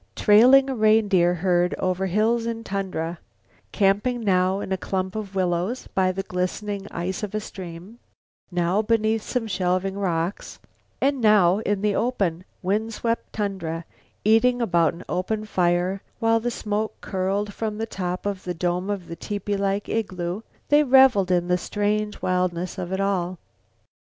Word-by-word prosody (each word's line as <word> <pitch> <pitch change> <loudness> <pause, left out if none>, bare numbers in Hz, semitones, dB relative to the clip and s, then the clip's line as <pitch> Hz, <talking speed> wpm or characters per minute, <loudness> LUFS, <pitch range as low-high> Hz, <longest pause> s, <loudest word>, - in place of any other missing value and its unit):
Trailing 250 +6 +6
a 270 - -1
reindeer 215 -6 +3
herd 180 0 +1
over 185 +1 -1
hills 225 +5 +1
and 230 0 -4
tundra; 185 -4 -3 0.5
camping 210 +5 +1
now 185 -2 +2
in 195 - -6
a - - +2
clump 190 0 -3
of 205 -3 -5
willows 185 +6 -1
by 185 -1 +2
the 195 +1 -4
glistening 195 +2 -3
ice 180 +2 -3
of 210 -1 -4
a - - +1
stream, 185 +2 -9 0.5
now 175 +2 +1
beneath 220 0 +1
some 245 +1 -2
shelving 185 -1 -1
rock, 180 -2 -1 0.6
and 275 -1 +1
now 205 -4 +5
in 205 -2 -1
the 210 -1 +2
open, 195 -8 -1 0.2
wind 215 +4 -1
swept 230 +1 -2
tundra; 170 -6 -3 0.4
eating 245 +3 +4
about 170 -8 +2
an 170 - -10
open 215 +4 -2
fire, 180 0 +1 0.2
while 225 -1 +2
the 240 +2 -2
smoke 215 -2 -3
curled 200 +2 -2
from 215 0 -3
the 225 - -2
top 180 -4 -4
of 200 -2 -3
the 180 -1 -4
dome 180 +3 -1
of 195 -4 -3
the 170 - -6
tepee 205 +2 -3
like 200 +1 -1
igloo, 185 -3 -2 0.3
they 295 +1 +6
reveled 265 -8 +5
in 175 -1 +2
the 180 0 +2
strange 210 +3 -1
wildness 180 0 -1
of 180 -1 -4
it 190 - -1
all. 185 -2 0
195 Hz, 160 wpm, -24 LUFS, 180-215 Hz, 0.6 s, Trailing